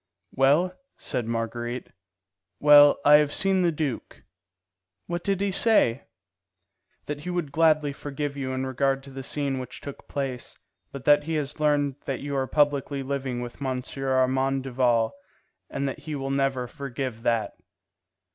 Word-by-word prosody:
"Well?" 145 +8 +3 0.2
said 120 -3 -3
Marguerite. 120 +1 -4 0.7
"Well, 145 -1 +7
I 150 +1 +9
have 150 -1 +1
seen 190 +2 +2
the 175 -1 +2
duke." 150 -5 -4 0.8
"What 175 0 -4
did 195 -1 0
he 200 -1 0
say?" 185 - +4 1.0
"That 145 0 -5
he 180 - -6
would 175 -5 -2
gladly 155 -2 +3
forgive 145 0 -5
you 135 -2 -4
in 130 0 -2
regard 135 +1 0
to 140 - -11
the 135 0 -7
scene 140 0 -2
which 125 0 -7
took 140 - -10
place, 135 -3 -5 0.3
but 135 -1 -9
that 145 0 +5
he 165 0 -2
has 150 0 -3
learned 145 -2 +1
that 135 - -3
you 140 0 -4
are 135 -1 0
publicly 145 -1 +1
living 130 -2 -3
with 120 +3 -8
M. 130 -2 -2
Armand 130 0 +1
Duval, 120 -3 +1 0.6
and 140 - -2
that 135 - -5
he 155 -2 -6
will 135 -1 -3
never 135 -2 0
forgive 130 -3 -6
that. 115 -2 0
140 Hz, 155 wpm, -25 LUFS, 130-150 Hz, 1.0 s, I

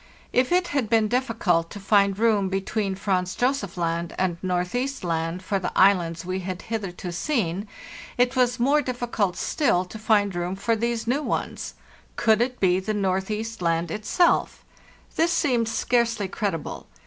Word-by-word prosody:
* - - -28
If 250 +3 +2
it 360 0 +2
had 270 -7 -1
been 225 -2 +3
difficult 210 -9 +1
to 205 - -8
find 200 -1 +3
room 210 -3 +2
between 195 +1 -1
Franz 185 -2 -1
Josef 245 -8 -1
Land 170 0 -2
and 180 -2 0
Northeast 185 +10 -2
Land 165 +1 -2
for 195 0 -1
the 180 - -3
islands 175 -3 +3
we 185 +1 -2
had 185 0 -5
hitherto 195 -5 -4
seen, 200 - -1 0.5
it 245 +2 +2
was 245 -1 +2
more 280 +5 +3
difficult 240 -7 -2
still 215 - +1
to 215 +4 -10
find 210 -2 +2
room 175 +1 -2
for 225 +4 0
these 230 0 -1
new 260 +5 +1
ones. - - -3 0.4
Could 220 -1 +3
it 250 +1 -1
be 185 -1 +3
the 215 +3 -3
Northeast 205 +3 -2
Land 165 -1 0
itself? 215 - +1 0.5
Thisseemed 305 -9 +2
scarcely 235 -3 +1
credible. 190 -6 -4
205 Hz, 160 wpm, -25 LUFS, 185-235 Hz, 0.5 s, been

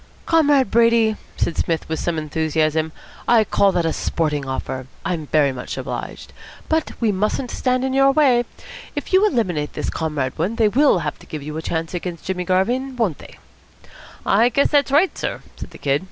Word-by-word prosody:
"Comrade 290 -8 +3
Brady," 230 -1 +4 0.2
said 170 - 0
Psmith 165 -2 -1
with 160 0 -3
some 170 -2 -1
enthusiasm, 155 0 0 0.4
"I 230 -2 +5
call 200 -1 +3
that 175 - +1
a 165 - 0
sporting 150 -4 -1
offer. 130 -1 -4 0.2
I'm 160 -4 -2
very 145 -2 +3
much 125 -2 -6
obliged. - - -6 0.3
But 320 0 0
we 225 -3 +2
mustn't 210 +6 -1
stand 255 0 0
in 265 - -1
your 270 0 +5
way. 265 -5 +3 0.5
If - - -5
you 380 +2 +6
eliminate 180 - -1
this - - -3
Comrade 150 -5 -2
Wood, 195 +8 -1
they 220 -3 +4
will 275 +1 +4
have - - -4
to - - -16
give 155 -2 -6
you 150 +1 -6
a 160 - -3
chance 160 +1 -3
against 175 -2 -5
Jimmy 180 -1 -2
Garvin, 245 +9 0
won't 210 - -1
they?" - - -13 0.9
"I 225 +5 +4
guess 280 +4 +2
that's 285 -2 +3
right, 320 +7 +3
sir," - - -4
said - - -8
the - - -13
Kid. 140 0 +1
190 Hz, 190 wpm, -21 LUFS, 160-250 Hz, 0.9 s, you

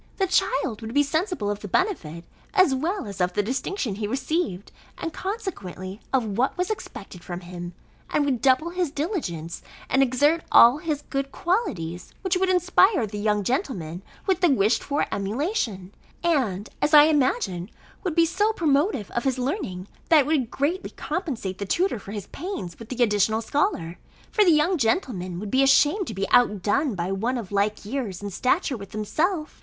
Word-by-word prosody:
The 390 - +2
child 290 - 0
would 225 +3 -6
be 290 - +5
sensible 315 - -1
of 205 - -4
the 205 - -7
benefit, 175 - -1 0.3
as 370 -8 +5
well 330 - -1
as 200 -3 -6
of 180 0 +1
the 205 - +1
distinction, 260 - -2
he 205 +1 -3
received, 260 - -2 0.3
and 330 - -4
consequently 200 - -5
of 260 -3 +2
what 265 +7 +1
was 360 +3 0
expected 195 - -7
from 175 0 -6
him, 175 -1 -8 0.3
and 295 - +1
would 260 -5 0
double 270 +6 +3
his 355 -2 -1
diligence, 280 - -3 0.3
and 270 - +4
exert 290 +5 +3
all 240 +5 +8
his 305 -3 -3
good 275 0 -2
qualities, 210 - -2
which 375 -1 +1
would 375 +1 +1
inspire 370 - +4
the 210 0 -6
young 210 -1 +1
gentleman 190 - -2 0.2
with 380 -2 +1
the 350 - +5
wished 220 -4 +3
for 285 +1 0
emulation, 210 - -2 0.3
and, 245 - 0
as 300 +1 +4
I 295 - +10
imagine, 245 - +1 0.3
would 360 -5 -2
be 335 -1 +5
so 410 +6 +1
promotive 295 - +1
of 240 - -2
his 265 -2 0
learning, 250 - -3 0.2
that 320 -3 +7
it - - -2
would 285 -6 +1
greatly 325 +7 -1
compensate 240 - -4
the 200 - -4
tutor 355 - +1
for 200 - -10
his 205 -2 -5
pains 285 - -6
with 230 0 -10
the 255 -1 +1
additional 220 +1 +2
scholar; 220 - -1 0.3
for 425 - +4
the 375 - +4
young 320 +3 +3
gentleman 220 - -1
would 205 0 -6
be 265 - +4
ashamed 290 +8 +4
to 220 - -5
be 195 +1 -1
outdone 240 - +3
by 175 +1 -2
one 230 +7 -1
of 215 -6 -6
like 205 +1 0
years 210 -5 -4
and 200 -2 -5
stature 260 - +1
with 200 -1 -10
himself. 305 - -1
260 Hz, 180 wpm, -25 LUFS, 200-330 Hz, 0.3 s, I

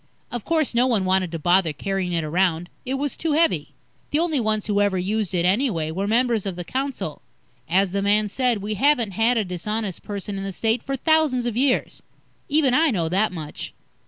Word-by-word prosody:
Of 240 -3 -4
course, 320 -5 0
no 245 +2 +3
one 220 -7 +1
wanted 185 -2 +1
to 165 - -3
bother 175 0 +2
carrying 190 +3 -2
it 165 -2 0
around. 175 +1 0 0.2
It 265 - -1
was 285 +1 -2
too 320 -2 -1
heavy. 165 - +1 0.3
The 290 - 0
only 320 -3 +1
ones 215 -2 0
who 205 -1 +1
ever 200 -2 +2
used 205 +2 -1
it, 170 -1 +1
anyway, 185 - +1
were 195 +5 -2
members 230 -2 +1
of 190 - -3
the 175 - -5
council. 270 +8 -4 0.5
As 190 +2 +2
the 200 +1 -1
man 210 +1 +2
said, 235 -1 0
we 215 +1 -2
haven't 240 -1 +2
had 225 +5 +2
a 215 - +1
dishonest 190 +2 -3
person 200 -1 -5
in - - -5
the 195 - -4
State 225 +4 +1
for 275 - -3
thousands 300 -4 +2
of 240 -3 -2
years. 255 +1 +1 0.5
Even 290 -3 +3
I 315 +4 +4
know 170 -9 0
that 195 +4 +1
much. 155 -4 -6
210 Hz, 210 wpm, -23 LUFS, 185-250 Hz, 0.5 s, I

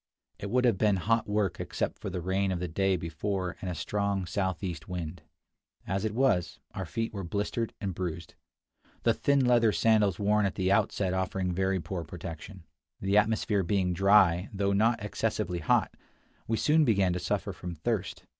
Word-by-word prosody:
It 100 - -5
would 125 +3 +2
have 115 -6 +2
been 105 -2 +3
hot 110 +4 +1
work 105 -4 0
except - - -3
for - - -5
the 90 -1 -4
rain 95 +2 0
of 90 - -2
the 90 - -2
day 95 +3 +1
before 90 +3 -3
and 95 - -3
a 90 - -3
strong 100 -1 -1
southeast 90 -2 -3
wind. 85 -2 -5 0.6
As 95 +3 -1
it 110 0 -2
was, 115 -10 +1
our 95 -3 -5
feet 115 +4 -3
were 100 -2 -4
blistered 105 +5 -2
and 100 -3 -3
bruised, 85 -2 -5 0.7
the - - +4
thin 140 -2 +2
leather 120 -3 +4
sandals 105 -4 +3
worn 105 0 +2
at 95 - -5
the 95 -1 +1
outset 100 -1 +1
offering 95 0 -1
very 95 +1 0
poor 85 +1 -4
protection. 85 +2 -9 0.3
The 95 +1 0
atmosphere 105 -1 +1
being 90 0 0
dry, 95 -1 +4
though 100 0 0
not 110 +1 +2
excessively 90 -3 -2
hot, 75 - +2 0.5
we 115 - 0
soon 155 +5 +4
began 100 -8 +3
to 90 - -2
suffer - - -2
from 90 -1 -7
thirst. 95 +2 -3
95 Hz, 180 wpm, -29 LUFS, 90-105 Hz, 0.7 s, the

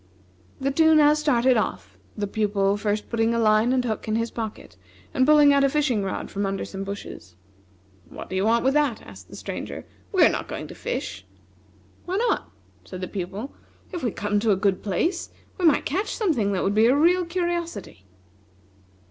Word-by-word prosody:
The 275 +1 0
two 320 +2 +4
now 300 -1 +6
started 260 -5 +2
off, 220 - -3 0.2
the 205 - -1
Pupil 200 -1 0
first 205 0 -2
putting 230 0 0
a - - +1
line 215 +2 +3
and 255 -1 +1
hook 220 -2 -3
in 215 - 0
his 230 0 -1
pocket, 220 - -6 0.4
and 260 - +2
pulling 295 -1 +6
out 280 0 +3
a 275 - +4
fishing 265 -8 +1
rod 195 - -4
from 200 - -2
under 195 0 -3
some 195 0 -6
bushes. 195 - -8 0.7
"What - - -9
do 185 - -6
you 190 - +1
want 230 +3 +2
with 265 - +3
that?" 290 -6 +1
asked - - -13
the - - -11
Stranger, - - -6 0.3
"we 375 - +4
are - - +6
not - - -3
going - - -6
to - - -8
fish!" 485 - -5 0.8
"Why 370 +2 -2
not?" 470 +2 0 0.3
said 185 -1 -9
the 185 - -3
Pupil; 200 +8 -6 0.4
"if 350 - -5
we 245 - 0
come 205 0 -1
to 225 +1 0
a 200 - +5
good 190 0 0
place, 330 - -1 0.3
we 360 - +1
might 310 -3 +4
catch 375 +9 -2
something 290 - 0
that 190 - -1
would 195 - +1
be 220 +2 +4
a 255 - +4
real 355 +4 +4
curiosity." 340 - -4
230 Hz, 200 wpm, -24 LUFS, 205-300 Hz, 0.8 s, now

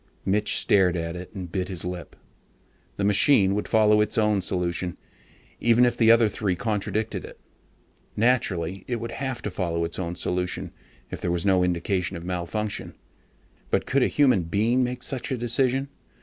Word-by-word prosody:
Mitch 105 +2 +2
stared 90 -3 +3
at 85 0 -4
it 90 +1 -8
and 90 -3 -6
bit 95 -1 -2
his 90 -3 -6
lip. 90 -1 -6 0.8
The 100 - -2
machine 100 0 +4
would 105 - -2
follow 105 -1 +4
its 105 - 0
own 105 -3 +2
solution, 90 -1 -2 0.6
even 120 +1 +4
if 120 - +1
the 115 -1 +3
other 115 -1 +6
three 100 -2 -1
contradicted 105 +1 -2
it. - - -11 0.8
Naturally 95 -6 0
it 125 - -1
would 115 0 -5
have 130 -3 -4
to 105 - -3
follow 85 -2 -1
its 85 - -6
own 85 -1 -3
solution, 90 +1 -3 0.4
if - - -6
there - - -1
was 85 +1 -1
no 95 -2 +3
indication 90 +1 -1
of 85 - -9
malfunction. 90 +4 -3 0.7
But - - 0
could 135 +1 +1
a - - +4
human 130 -9 +3
being 110 +8 +1
make 125 0 -3
such 130 -1 -4
a 130 - 0
decision? 125 +3 0
100 Hz, 175 wpm, -25 LUFS, 90-115 Hz, 0.8 s, other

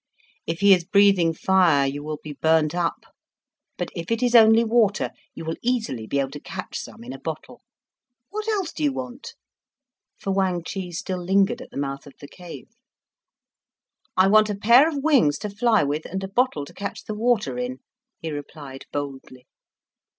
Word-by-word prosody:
If 165 +3 -3
he 200 -1 +7
is 180 -2 +2
breathing 195 -2 +4
fire 165 -4 +3
you 140 +2 -3
will 155 0 -4
be 150 - -7
burnt 160 +1 +2
up, 175 -1 -2 0.7
but - - -4
if 170 0 -6
it 230 +2 0
is 245 -1 +1
only 225 0 +7
water, 225 -3 +2 0.2
you - - -7
will 160 +1 -3
easily 220 - -2
be 140 - -1
able 135 -1 -1
to 145 - -7
catch - - -8
some - - -10
in 120 - -8
a - - -7
little - - -24
bottle. 155 0 -7 0.7
What 430 +1 -4
else 395 -6 -1
do 310 - -4
you 290 - +3
want?" 260 - -7 0.8
For 195 - -3
Wang 190 -3 0
Chih 180 +1 -5
still 180 +1 -4
lingered 195 +6 +2
at - - -11
the - - -10
mouth 140 0 -4
of 140 - -14
the 145 - -10
cave. 175 +3 -11 1.5
"I 185 +1 +6
want 215 +1 +5
a 205 - -1
pair 240 +9 +6
of 285 -4 -4
wings 260 - +4
to 210 - -5
fly 220 0 +2
with, 145 +2 -2
and 190 +2 -4
a - - -3
bottle 195 - 0
to - - -14
catch 200 - -6
the 215 - -5
water 235 +2 0
in," 250 +1 -3 0.4
he 160 - -6
replied 145 -2 -8
boldly. 135 -3 -6
190 Hz, 190 wpm, -23 LUFS, 150-230 Hz, 1.5 s, he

